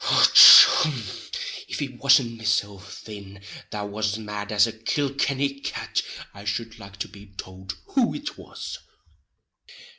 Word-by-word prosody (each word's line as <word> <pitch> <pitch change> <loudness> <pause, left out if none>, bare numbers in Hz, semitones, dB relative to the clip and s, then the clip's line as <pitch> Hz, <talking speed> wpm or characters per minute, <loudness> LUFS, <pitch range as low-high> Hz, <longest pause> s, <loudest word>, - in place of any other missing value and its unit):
Och, - - +2 0.5
hon! 155 -4 -2 0.7
if - - -7
it 130 -4 -7
wasn't 125 -3 +3
mesilf 105 -2 -4
thin 100 -2 -12 0.3
that 105 -1 -6
was 105 0 -3
mad 105 -1 -8
as 105 0 +3
a 115 - -5
Kilkenny 140 +4 -3
cat 140 0 -4 0.3
I 100 - -13
shud 115 +3 -5
like 100 -1 -14
to 100 - -5
be 100 0 -16
tould 95 +1 -9
who 260 -4 -1
it 300 +1 -7
was! - - -10
110 Hz, 140 wpm, -23 LUFS, 100-135 Hz, 0.7 s, wasn't